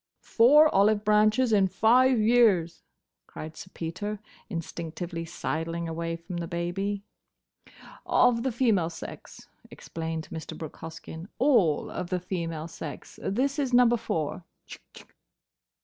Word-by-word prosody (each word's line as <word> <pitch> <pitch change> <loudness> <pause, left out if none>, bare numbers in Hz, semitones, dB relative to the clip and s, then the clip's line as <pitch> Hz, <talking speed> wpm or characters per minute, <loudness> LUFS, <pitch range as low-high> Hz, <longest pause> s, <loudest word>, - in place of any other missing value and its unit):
"Four 290 +7 +6
olive 205 +2 +3
branches 215 +3 +3
in 195 -2 +4
five 245 +7 +4
years!" 215 -7 +3 0.5
cried 155 0 -8
Sir 185 - -10
Peter, 180 +6 -4 0.3
instinctively 170 -1 -5
sidling 165 +1 -3
away 165 +1 -3
from 170 +2 -7
the 170 -1 -4
baby. 195 +4 -3 1.0
"Of 235 -2 +4
the 260 +1 -1
female 220 -8 +2
sex," 165 - -10 0.2
explained 160 -1 -6
Mr. 160 -1 -7
Brooke 160 -2 -8
Hoskyn: 160 +1 -9
"all 225 - +3
of 180 - -5
the 185 -1 -1
female 165 -3 -4
sex. 160 -3 -9
This 270 +8 -1
is 260 -3 +1
Number 245 -1 +6
Four. 175 -6 -3
180 Hz, 120 wpm, -27 LUFS, 165-225 Hz, 1.0 s, Four